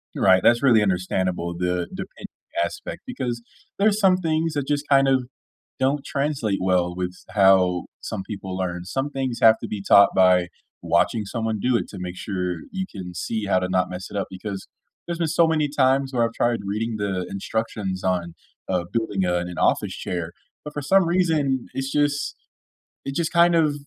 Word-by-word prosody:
You're - - -1
right, 95 -1 +6
that's 120 +2 +4
really 120 -5 +5
understandable, 90 -2 -1
the 90 -1 -1
the - - -5
pend - - -9 0.4
aspect, 85 - -6
because 120 -2 -4 0.4
there's 210 +1 +3
some 190 -3 +5
things 160 -2 0
that 140 -2 -2
just 145 0 0
kind 135 -1 +5
of 130 -2 +3 0.6
don't 135 +2 +1
translate 140 -8 -1
well 90 -1 +1
with 90 -1 -2
s - - -19
how 95 -3 +4 0.2
some 95 - -4
people 95 -2 -6
learn. 90 -1 -3
Some 135 +8 -2
things 130 -3 -3
have 110 0 +7
to - - -6
be 100 -2 -5
taught 100 0 +8
by 90 -1 +5 0.3
watching 85 +6 +1
someone 110 -1 -2
do 125 +2 +2
it - - -4
to - - -9
make 90 0 -5
sure 90 -4 -3
you 190 -1 -3
can 90 -3 -7
see 110 +5 -3
how 95 -2 +2
to 90 0 -2
not 90 0 +1
mess 90 0 -6
it 100 - -5
up, 100 - -1
because 95 +1 -6 0.4
there's 170 0 -4
been 165 - +1
so 165 +1 +4
many 155 -2 +1
times 135 -1 +2
where 120 -2 +1
I've 115 0 -1
tried 120 -1 0
reading 110 +3 -2
the 95 -3 -2
instructions 100 -1 -3
on, 90 -2 -1 0.3
uh, 90 -2 0
building, 105 -4 -1
uh, 90 0 +1
an 90 - -8
office - - +2
chair, 85 -2 -4 0.3
but 150 0 -8
for 145 - -3
some 190 +5 +4
reason, 155 -8 +1
it's 135 0 -3
just 145 -1 0 0.7
it 135 - -4
just 170 -2 0
kind 170 0 +5
of 155 -3 +3
110 Hz, 195 wpm, -23 LUFS, 95-140 Hz, 0.7 s, taught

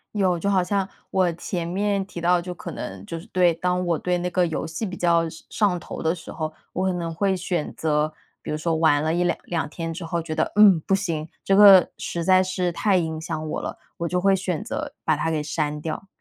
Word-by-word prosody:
有， 185 -4 +2
就 200 - -3
好 190 -2 +3
像 195 +1 0 0.2
我 185 -2 +2
前 170 0 -4
面 200 +2 0
提 175 -3 -8
到， 175 +1 +3
就 180 +1 -6
可 175 - -8
能 95 -1 -7
就 165 - -5
是 165 - -12
对， 180 -4 +3
当 180 +2 -1
我 170 -2 +1
对 180 0 0
那 180 +1 -2
个 180 0 +2
游 160 - -3
戏 165 +7 -4
比 185 - -5
较 170 -2 +2
上 - - -7 0.4
上 180 -1 -2
头 - - -7
的 160 0 +2
时 160 - -10
候， 155 -1 -4 0.2
我 185 +1 -1
可 185 - +1
能 170 -2 -3
会 190 +3 +1
选 175 -3 -2
择， 155 -1 0 0.3
比 - - -5
如 150 - -1
说 165 +1 0
玩 160 -2 +3
了 160 - +1
1、2 175 0 +1
2 165 -4 -2
天 165 +1 -5
之 170 +1 -6
后， 170 0 -2
觉 160 -1 -5
得， - - 0
嗯， 205 -5 +7
不 195 - -1
行， 165 -5 -2 0.2
这 195 - +3
个 195 -2 +8
实 170 -1 -3
在 185 +1 +5
是 185 -1 -1
太 195 +2 +2
影 160 -2 -2
响 155 -1 -4
我 - - -2
了， - - -6 0.2
我 170 - -2
就 180 +2 0
会 195 0 +4
选 185 -4 -2
择 - - -4
把 155 - +2
它 160 +2 -1
给 155 -2 0
删 150 -1 -2
掉。 160 +5 -5
175 Hz, 255 characters per minute, -24 LUFS, 160-185 Hz, 0.4 s, 个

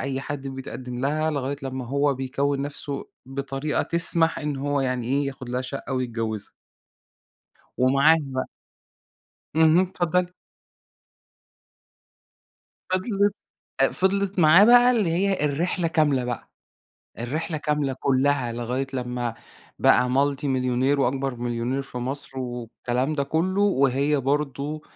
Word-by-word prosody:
أي 135 0 -2
حد 140 0 -5
بيتقدّم 130 -2 -7
لها 155 +4 0
لغاية 140 -1 -2
لمّا 130 -1 -4
هو 140 +2 +1
بيكوِّن 140 +2 -1
نَفسه 145 -1 -4 0.2
بطريقة 140 +2 -2
تسمح 165 -1 +4
إن 150 -2 -3
هو 145 +1 -1
يعني 125 -3 -1
إيه، 140 +2 +1
ياخد 130 -2 -7
لها 125 +1 -1
شقة 135 +1 -6
ويتجوّزها. 115 -5 -3 1.3
ومعاهم 140 +3 +3
بقى. 130 0 -2 1.1
اهم، 160 +1 +5
اتفضّلي. 180 -1 0 2.6
فضلِت 200 +2 +1 0.5
أ - - +6
فضلِت 195 0 0
معاه 170 +4 +7
بقى 245 +2 +7
اللي 215 -8 +1
هي 190 -2 +1
الرحلة 165 +4 0
كاملة 150 -6 +2
بقى. 120 -1 -5 0.7
الرحلة 155 +7 -3
كاملة 150 -2 -1
كُلّها، 130 -1 +1
لغاية 120 +3 -2
لمّا 125 -2 -3 0.4
بقى 125 +1 +4
multi 140 +2 +1
مليونير 130 +1 +1
وأكبر 135 0 0
مليونير 120 +2 -2
في 135 -2 -8
مصر 135 +2 -5
والكلام 125 +2 -3
ده 140 - 0
كُلّه، 170 +7 0
وهي 140 -5 +2
برضه 145 +2 -2
140 Hz, 120 wpm, -24 LUFS, 130-155 Hz, 2.6 s, معاه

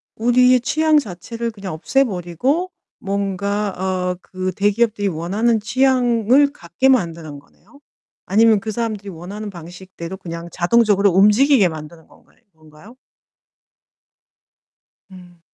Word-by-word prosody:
우리의 250 +2 +3
취향 310 +4 +2
자체를 230 0 -4
그냥 195 -5 -7
없애 270 +12 +1
버리고 245 - -2 0.3
뭔가 200 +1 -2
어 185 -1 -2
그 185 0 -5
대기업들이 205 +1 +1
원하는 200 +7 0
취향을 250 +2 +2
갖게 170 +9 -1
만드는 165 - -1
거네요. 205 - -23 0.5
아니면 220 +2 +4
그 215 +2 -5
사람들이 215 -3 -4
원하는 195 +5 -8
방식대로 175 +1 -10
그냥 170 -2 -8
자동적으로 200 +2 +2
움직이게 210 +5 +4
만드는 160 0 -9
건가요 - - -25 0.2
건가요? 155 +9 -17 2.2
음. 180 -2 -15
200 Hz, 285 characters per minute, -19 LUFS, 180-235 Hz, 2.2 s, 아니면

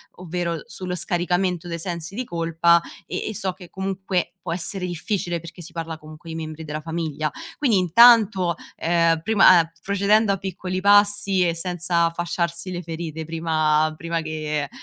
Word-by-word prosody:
ovvero 175 -1 -3
l 160 - -8
sullo 180 -1 -5
scaricamento 175 0 0
dei 170 -1 -4
sensi 170 +1 -5
di 250 - -2
colpa, 170 -3 +2 0.2
e - - -4
e 215 - -6
so 190 0 -1
che 180 -1 -14
comunque 190 -1 -2
può 170 -2 -3
essere 180 +2 -3
difficile 175 0 -2
perché 170 +2 -11
si 165 - -11
parla 165 -1 -5
comunque 155 +2 -12
di 160 - -5
membri 160 0 -6
della 155 0 -5
famiglia. 160 -2 -3 0.3
Quindi 245 -8 +2
intanto, 190 -1 +5 0.2
ehm, 165 -1 +2
prima 195 -2 +6
uhm, 165 0 -1
procedendo 200 +2 +3
a 195 - 0
piccoli 185 0 -4
passi 200 -1 +4
e 170 - +1
senza 170 0 0
fasciarsi 170 +1 -2
le 175 -1 -4
ferite 160 -1 -5
prima 155 -1 +1
prima 165 0 -2
che 155 -2 -3
170 Hz, 165 wpm, -23 LUFS, 165-185 Hz, 0.3 s, prima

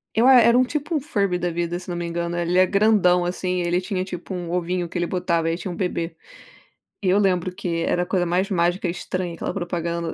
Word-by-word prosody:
Eu 230 +3 +4
a 265 - +8
era 235 0 +5
um 255 - +5
tipo 290 +5 -3
um 305 - +2
furby 200 - -1
da 175 0 -1
vida, 175 +1 -2
se 180 - -11
não 175 - -3
me 175 - -3
engano, 170 0 -3
ele 175 +1 +1
é 185 - +5
grandão, 195 -3 +3
assim, 180 0 -2
ele 175 +1 0
tinha, 185 -1 -2
tipo, 180 0 -8
um 175 -2 -4
ovinho 180 0 -1
que 170 - -16
ele 175 -1 0
botava 170 -3 0
e 165 - -1
tinha 185 - -5
um - - -6
bebê. 175 -2 -2 0.9
E 185 - +2
eu 190 - +4
lembro 185 -3 +1
que 180 -3 -3
era 175 - +1
a - - -5
coisa 180 -1 0
mais 180 +3 +1
mágica 175 +1 +1
e - - 0
estranha, 180 0 -4
aquela - - -4
propaganda. 170 -2 -3
180 Hz, 250 wpm, -23 LUFS, 175-190 Hz, 0.9 s, a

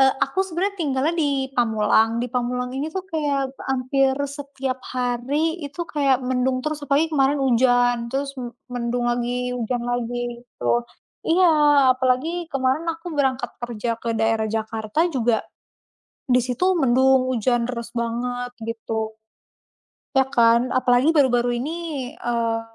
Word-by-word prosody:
eee, 265 0 +5
aku 275 +7 -8
sebenarnya 385 +2 -2
tinggalnya 285 0 +1
di 280 -4 0
Pamulang, 225 -2 +3
di 245 - -3
Pamulang 250 0 -1
ini 285 +3 -2
tuh 380 -1 -3
kayak 285 -5 -1 0.2
hampir 265 +1 +1
setiap 275 -2 -5
hari 265 +7 -1
itu 285 +5 -7
kayak 275 -5 +1
mendung 255 0 0
terus, 305 0 -2
apalagi 290 +4 +1
kemarin 280 -1 +3
hujan, 245 -1 +3
terus 275 +2 -2
men 240 -1 -6 0.2
mendung 245 0 -1
lagi, 245 +1 -1
hujan 245 0 -2
lagi, 245 0 -3
gitu. 240 -1 -1 0.4
Iya, 350 +1 +5 0.5
apalagi 275 +7 0
kemarin 270 +3 +1
aku 330 +2 -13
berangkat 265 -2 0
kerja 235 -1 -3
ke 230 -1 -2
daerah 225 0 +1
Jakarta 220 +5 -1
juga, 240 -4 +1 0.9
di 250 0 +5
situ 250 +7 -1
mendung, 265 -2 +4
hujan 240 0 +1
deres 235 -2 -5
banget, 245 +1 -2
gitu. 220 -1 -4 1.0
Ya 265 0 +4
kan, 235 0 +3
apalagi 255 +3 +4
baru-baru 245 -4 +3
ini, 305 -3 -4
eee, 230 -1 -1
255 Hz, 135 wpm, -23 LUFS, 240-275 Hz, 1.0 s, eee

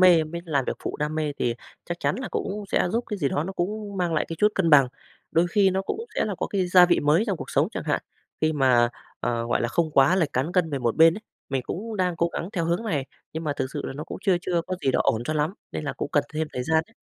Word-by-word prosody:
mê 175 -4 +7
mới 170 +2 -6
làm 145 -5 0
việc - - -1
phụ - - -3
đam 150 +1 -2
mê 155 -2 -1
thì 120 -1 0 0.3
chắc 175 0 -5
chắn - - +1
là 260 - -4
cũng 205 +1 -3
sẽ - - +2
giúp 235 +1 0
cái 210 - -4
gì 145 -6 +1
đó 145 +3 -1
nó 190 - -4
cũng 200 +3 -3
mang 175 -3 0
lại 155 - +1
cái 165 - -5
chút 210 - +5
cân 170 -4 +2
bằng. 140 -4 +7 0.4
Đôi 165 +2 +3
khi 200 -1 +4
nó 190 +1 0
cũng 425 - -4
sẽ - - +1
là 205 - -2
có - - -1
cái 190 -3 0
gia 180 0 +7
vị 175 - +3
mới 150 +8 +3
trong 195 - 0
cuộc - - -8
sống - - +2
chẳng - - -5
hạn, - - 0 0.4
khi 155 0 +2
mà, 130 -5 +4 0.3
ờ, 115 -1 -1
gọi 120 - +1
là, 120 - 0
không 160 +5 0
quá 140 +5 +5
lệch 165 -6 +1
cán 135 +7 -1
cân 175 -3 +2
về 140 - -1
một 120 -2 0
bên 165 +1 +7
ấy, 210 - -7 0.3
mình 135 -2 -1
cũng 215 - -5
đang 180 -3 0
cố 170 0 +2
gắng 170 - -3
theo 170 -4 -1
hướng 170 +7 0
này, 145 - -1 0.3
nhưng 160 +1 -4
mà 150 - 0
thực - - -1
sự 145 - -4
là - - -4
nó 150 +3 -6
cũng - - -7
chưa 190 -2 +3
chưa 175 -2 0
có 185 - -3
gì 135 - +4
đó - - +2
ổn 115 +1 +1
cho 155 - -1
lắm 155 +4 0 0.2
nên - - -4
là 145 - -2
cũng - - -4
cần 145 - +3
thêm 155 +1 -1
thời 125 - -2
gian 160 +4 +2
ấy. 230 - -26
165 Hz, 300 wpm, -25 LUFS, 145-185 Hz, 0.4 s, mê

